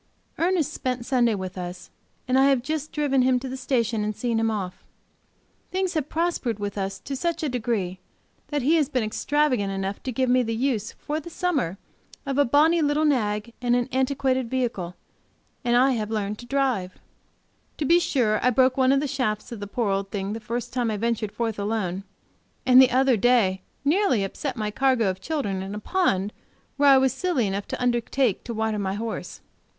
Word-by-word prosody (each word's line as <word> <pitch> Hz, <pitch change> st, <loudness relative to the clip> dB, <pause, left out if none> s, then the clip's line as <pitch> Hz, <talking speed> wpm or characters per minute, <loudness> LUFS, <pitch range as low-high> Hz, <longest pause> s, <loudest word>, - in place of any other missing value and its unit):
Ernest 330 Hz, -4 st, +1 dB
spent 250 Hz, -2 st, -3 dB
Sunday 240 Hz, -4 st, +2 dB
with 185 Hz, -1 st, -5 dB
us, 180 Hz, 0 st, -7 dB, 0.4 s
and 255 Hz, -, +1 dB
I 270 Hz, -, +6 dB
have 270 Hz, -3 st, +3 dB
just 310 Hz, +1 st, -3 dB
driven 285 Hz, -3 st, +1 dB
him 255 Hz, 0 st, +3 dB
to 265 Hz, -, -6 dB
the 260 Hz, -, -5 dB
station 235 Hz, -4 st, 0 dB
and 210 Hz, 0 st, -2 dB
seen 235 Hz, -1 st, -1 dB
him 225 Hz, -, +1 dB
safely 220 Hz, -, 0 dB
off. 185 Hz, -3 st, -5 dB, 0.9 s
Things 375 Hz, 0 st, -1 dB
have 305 Hz, -4 st, -2 dB
prospered 325 Hz, -, -1 dB
with 205 Hz, -1 st, -4 dB
us 195 Hz, -1 st, -3 dB
to 275 Hz, -, -5 dB
such 335 Hz, +4 st, -2 dB
a 300 Hz, -, 0 dB
degree 220 Hz, -7 st, -2 dB, 0.5 s
that 290 Hz, -3 st, -2 dB
he 315 Hz, +6 st, +4 dB
has 295 Hz, -4 st, +1 dB
been 255 Hz, -5 st, 0 dB
extravagant 250 Hz, -1 st, 0 dB
enough 195 Hz, +1 st, -3 dB
to 260 Hz, -, -4 dB
give 255 Hz, +2 st, 0 dB
me 250 Hz, +1 st, +4 dB
the 230 Hz, -2 st, -2 dB
use, 230 Hz, -4 st, -1 dB
for 300 Hz, +1 st, -4 dB
the 320 Hz, -, -9 dB
summer, 295 Hz, -, -1 dB, 0.5 s
of 275 Hz, 0 st, -1 dB
a 285 Hz, -, +5 dB
bonnie 310 Hz, +6 st, +4 dB
little 295 Hz, +1 st, +2 dB
nag 220 Hz, -5 st, 0 dB
and 245 Hz, -1 st, +2 dB
an 245 Hz, -1 st, +1 dB
antiquated 260 Hz, -1 st, 0 dB
vehicle, 230 Hz, -9 st, -2 dB, 0.7 s
and 240 Hz, -1 st, +2 dB
I 265 Hz, +2 st, +5 dB
have 215 Hz, -4 st, -2 dB
learned 210 Hz, -1 st, -2 dB
to 240 Hz, -, -10 dB
drive. 250 Hz, -9 st, 0 dB, 0.8 s
To 300 Hz, -, -1 dB
be 340 Hz, +5 st, +5 dB
sure 250 Hz, -11 st, +1 dB
I 250 Hz, -, +5 dB
broke 255 Hz, +1 st, +3 dB
one 260 Hz, 0 st, +4 dB
of 275 Hz, 0 st, +3 dB
the 295 Hz, -, -1 dB
shafts 255 Hz, -5 st, -2 dB
of 235 Hz, -, -6 dB
the 205 Hz, -, -5 dB
poor 215 Hz, 0 st, -1 dB
old 195 Hz, 0 st, -1 dB
thing 195 Hz, 0 st, -3 dB
the 225 Hz, -, -4 dB
first 230 Hz, +2 st, -4 dB
time 245 Hz, -2 st, 0 dB
I 215 Hz, -, -1 dB
ventured 225 Hz, -1 st, -1 dB
forth 225 Hz, -2 st, -3 dB
alone, 200 Hz, -3 st, -2 dB, 0.6 s
and 255 Hz, 0 st, +8 dB
the 260 Hz, -, +6 dB
other 260 Hz, -1 st, +3 dB
day 205 Hz, -5 st, +3 dB, 0.2 s
nearly 295 Hz, -, +3 dB
upset 255 Hz, +6 st, -4 dB
my 210 Hz, -1 st, -2 dB
cargo 255 Hz, -4 st, +2 dB
of 185 Hz, 0 st, -10 dB
children 205 Hz, -12 st, -2 dB
in 195 Hz, +2 st, -5 dB
a -, -, -4 dB
pond 210 Hz, -, 0 dB, 0.4 s
where 285 Hz, 0 st, +5 dB
I 270 Hz, -, +8 dB
was 265 Hz, -1 st, +3 dB
silly 270 Hz, -4 st, 0 dB
enough 200 Hz, +1 st, -3 dB
to -, -, -4 dB
undertake 245 Hz, -2 st, +1 dB
to 235 Hz, -, -4 dB
water 220 Hz, -1 st, -1 dB
my 195 Hz, -1 st, -2 dB
horse. 225 Hz, +2 st, -5 dB
245 Hz, 205 wpm, -25 LUFS, 210-275 Hz, 0.9 s, and